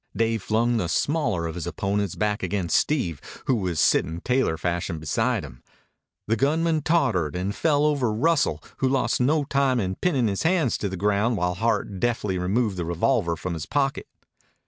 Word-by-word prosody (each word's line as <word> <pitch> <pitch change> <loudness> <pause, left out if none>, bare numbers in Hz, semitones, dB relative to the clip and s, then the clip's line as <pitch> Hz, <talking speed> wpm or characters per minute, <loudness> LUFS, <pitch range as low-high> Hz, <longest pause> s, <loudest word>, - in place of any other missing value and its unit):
Dave 115 -1 0
flung 115 +4 +1
the 90 -6 -1
smaller 115 - 0
of 80 - -3
his 90 -1 -5
opponents 100 +1 -2
back 105 0 -1
against 90 -3 -1
Steve, 90 - 0 0.2
who - - +2
was 90 -8 -1
sitting 80 +3 +2
tailor 125 -7 0
fashion 85 -1 -2
beside 110 - 0
him. 60 -3 -13 0.6
The 110 - +1
gunman 155 +6 +1
tottered 125 - +1
and 95 +3 -2
fell 150 +1 +2
over 140 -6 +1
Russell, 150 +8 +1
who 130 - +1
lost 130 -1 +1
no 145 +4 +2
time 135 -2 +1
in 95 -3 -1
pinning 135 - +1
his 100 -2 -2
hands 165 -7 +1
to 100 - -2
the 95 - -5
ground 105 +4 +1
while 90 0 0
Hart 105 -1 -1
deftly 105 -5 -1
removed 100 +2 0
the 85 - -2
revolver 85 +1 +1
from 90 +2 -4
his 80 -2 -5
pocket. 135 -2 -1
105 Hz, 180 wpm, -24 LUFS, 90-135 Hz, 0.6 s, who